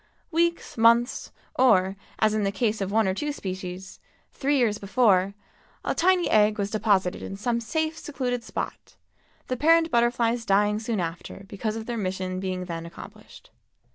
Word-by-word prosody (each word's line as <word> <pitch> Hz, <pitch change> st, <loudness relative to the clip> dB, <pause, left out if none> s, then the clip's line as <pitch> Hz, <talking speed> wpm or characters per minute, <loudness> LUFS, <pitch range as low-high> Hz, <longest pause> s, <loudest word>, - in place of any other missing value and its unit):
Weeks, 340 Hz, -6 st, 0 dB
months, 235 Hz, +2 st, +3 dB, 0.3 s
or—as 200 Hz, -2 st, +2 dB
in 215 Hz, -1 st, 0 dB
the 195 Hz, -, +1 dB
case 215 Hz, +1 st, -1 dB
of 195 Hz, 0 st, -2 dB
one 220 Hz, -1 st, +3 dB
or 190 Hz, -, +1 dB
two 295 Hz, +9 st, -2 dB
species—three 190 Hz, +7 st, -5 dB
years 220 Hz, -5 st, +1 dB
before, 200 Hz, -3 st, +2 dB, 0.5 s
a -, -, +1 dB
tiny 365 Hz, 0 st, +3 dB
egg 210 Hz, 0 st, +3 dB
was 200 Hz, -1 st, -2 dB
deposited 200 Hz, -4 st, +1 dB
in 195 Hz, -, -6 dB
some 235 Hz, +3 st, -1 dB
safe, 315 Hz, +7 st, -2 dB
secluded 250 Hz, -4 st, -3 dB
spot, -, -, -6 dB, 0.5 s
the 255 Hz, -, -2 dB
parent 330 Hz, +3 st, +4 dB
butterflies 235 Hz, 0 st, +2 dB
dying 210 Hz, 0 st, +2 dB
soon 220 Hz, -1 st, -2 dB
after 170 Hz, +3 st, -5 dB
because 215 Hz, +2 st, -3 dB
of 225 Hz, -1 st, -5 dB
their 240 Hz, 0 st, -4 dB
mission 185 Hz, -2 st, -3 dB
being 185 Hz, -1 st, -3 dB
then 170 Hz, -1 st, -5 dB
accomplished. 170 Hz, -, -13 dB
215 Hz, 155 wpm, -25 LUFS, 195-245 Hz, 0.5 s, parent